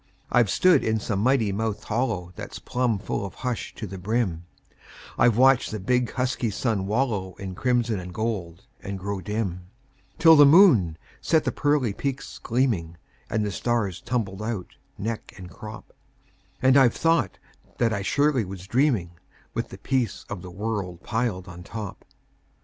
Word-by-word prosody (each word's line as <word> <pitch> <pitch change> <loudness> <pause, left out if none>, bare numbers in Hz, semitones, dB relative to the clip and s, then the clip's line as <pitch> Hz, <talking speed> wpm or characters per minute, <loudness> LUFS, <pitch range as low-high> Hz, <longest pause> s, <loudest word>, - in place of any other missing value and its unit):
I've 120 -4 +4
stood 185 - +4
in 110 0 +1
some 105 -2 -2
mighty 115 -2 +2
mouthed 110 +1 -2
hollow 105 -6 -2
That's - - -7
plumb 125 -3 0
full 100 0 -3
of 100 - -7
hush 125 -3 -4
to 115 - -5
the 95 -1 -7
brim; 95 -4 -1 0.7
I've 120 -2 +4
watched 130 0 +5
the 110 - -4
big, 125 +5 0
husky 125 -2 -1
sun 105 -2 -1
wallow 105 -5 -1
In 95 -2 -6
crimson 120 -1 +1
and 90 0 -7
gold, 95 -5 -3 0.2
and 100 0 -5
grow 100 +1 -4
dim, 95 -3 -3 0.5
Till 160 -1 +8
the 145 - +9
moon 140 - +6 0.2
set 160 -1 +2
the - - 0
pearly 145 -7 +1
peaks 140 +4 -4
gleaming, 110 -10 0 0.3
And 110 -1 0
the 105 - -2
stars 115 -5 -1
tumbled 105 -6 -2
out, 110 -4 -4 0.2
neck 110 +2 -5
and 90 -2 -10
crop; 110 +5 -10 0.7
And 130 +1 +6
I've 130 -4 +5
thought 165 0 +1 0.4
that 115 -2 +2
I 100 - -1
surely 140 +4 +2
was 95 -1 -8
dreaming, 115 - +1 0.4
With - - -3
the - - -9
peace 130 -5 -1
o' - - -1
the 90 -1 -9
world 100 -3 -4
piled 110 -6 -2
on 85 0 -9
top. 105 +2 -7
110 Hz, 165 wpm, -25 LUFS, 95-125 Hz, 0.7 s, the